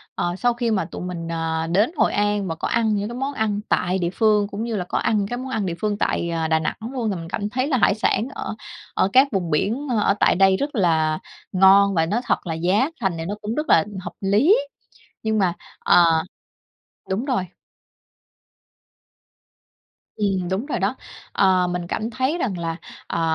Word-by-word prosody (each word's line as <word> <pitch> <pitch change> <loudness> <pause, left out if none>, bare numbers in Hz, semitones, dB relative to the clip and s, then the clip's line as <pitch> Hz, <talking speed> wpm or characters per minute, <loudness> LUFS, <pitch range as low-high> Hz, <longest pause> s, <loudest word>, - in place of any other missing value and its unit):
ờ, 175 0 -1
sau 245 +5 +1
khi 235 -1 -1
mà 190 -5 +1
tụi 165 - -8
mình, 170 -2 -5
à, 165 0 -2
đến 205 - +3
Hội - - +2
An 205 -1 0
và 165 - -3
có - - -3
ăn 225 -2 +1
những 210 +5 -3
món 275 +2 -2
ăn 215 -4 -1
tại 180 +1 +1
địa 170 -1 0
phương 210 -2 +3
cũng 205 +1 -5
như 230 -1 -3
là 180 -3 -2
có - - -2
ăn 220 - +1
những 200 -1 0
cái 245 - -4
món 260 +1 -6
ăn 220 -6 -1
địa 170 -2 -2
phương 210 -1 0
tại, 170 - -1
à, 165 -1 -1
Đà 160 0 +2
Nẵng 160 - -2 0.2
luôn, 240 -4 -1
thì 200 - -1
mình 165 -2 -7
cảm 205 +2 -3
thấy 255 +5 -1
là 275 -4 +1
hải 200 - +3
sản 220 +1 +1
ở - - -5 0.4
ở 190 - +2
các 265 +2 +6
vùng 180 -6 -1
biển 225 - 0 0.2
ở 200 - +3
tại - - +4
đây 190 0 +4
rất 285 +4 -3
là 160 -6 +2 0.3
ngon 195 +1 +6
và 160 -1 +3
nói 210 +8 -1
thật - - -1
là 165 - -1
giá 185 - +1
thành 190 -4 +1
thì 165 - -4
nó 200 +4 -3
cũng 215 +2 -3
rất 305 +1 -3
là 160 - +5 0.2
hợp - - -7
lý, 215 - +4 0.7
nhưng 220 0 0
mà 185 -3 +2 0.3
ờ, 165 -2 +4 0.9
đúng 195 +6 -1
rồi. 250 -10 -1 2.7
Ừm, 195 -4 -1
đúng 195 +8 -2
rồi 300 - -2
đó. - - -1 0.4
Ờ, 185 -2 +3
mình 175 0 -3
cảm 220 +5 -3
thấy 260 +8 -1
rằng 210 - -2
là, 165 -1 -3 0.3
ờ, - - -2
200 Hz, 210 wpm, -22 LUFS, 175-225 Hz, 2.7 s, các